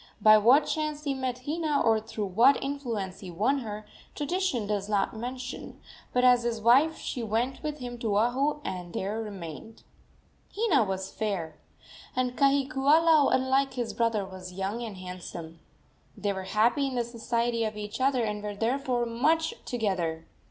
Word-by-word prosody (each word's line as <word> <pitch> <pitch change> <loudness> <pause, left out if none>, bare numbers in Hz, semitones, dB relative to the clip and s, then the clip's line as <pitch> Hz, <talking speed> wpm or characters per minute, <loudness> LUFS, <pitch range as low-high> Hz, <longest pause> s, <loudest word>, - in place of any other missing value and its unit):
By 215 0 +8
what 250 +8 +5
chance 305 -1 -2
he 285 -2 0
met 255 -1 -3
Hina, 305 -1 0
or 225 -1 +3
through 215 -1 -4
what 230 +9 +5
influence 230 -9 -3
he 190 - -8
won 220 +11 +1
her, 215 -3 -6 0.3
tradition 295 - -1
does 205 -1 -2
not 205 +1 0
mention, 250 +2 -6 0.3
but 250 - +1
as 250 -1 +6
his 235 -1 -2
wife 265 +8 +4
she 250 - -4
went 230 +4 -1
with 300 -1 -3
him 245 -3 -7
to 215 -3 0
Oahu, 270 +7 +1
and 180 -2 -5
there 205 +4 -2
remained. 200 0 -8 0.7
Hina 400 - +3
was 190 0 -4
fair, 180 -8 -3 0.6
and 250 -1 0
Kahikiula, 280 +3 +4
unlike 265 +1 +2
his 240 -3 -2
brother, 230 -4 0
was 185 -1 -9
young 195 +5 -3
and 220 -5 -6
handsome. 175 -3 -8 0.6
They 205 -1 -1
were 190 -1 -5
happy 235 +8 +2
in 265 - -4
the 240 - +1
society 235 0 -1
of 215 -1 -3
each 210 +3 -5
other, 260 -2 +2
and 210 -1 -2
were 205 0 -5
therefore 245 +2 0
much 315 +8 +1
together. 180 -9 -2
235 Hz, 165 wpm, -28 LUFS, 205-270 Hz, 0.7 s, By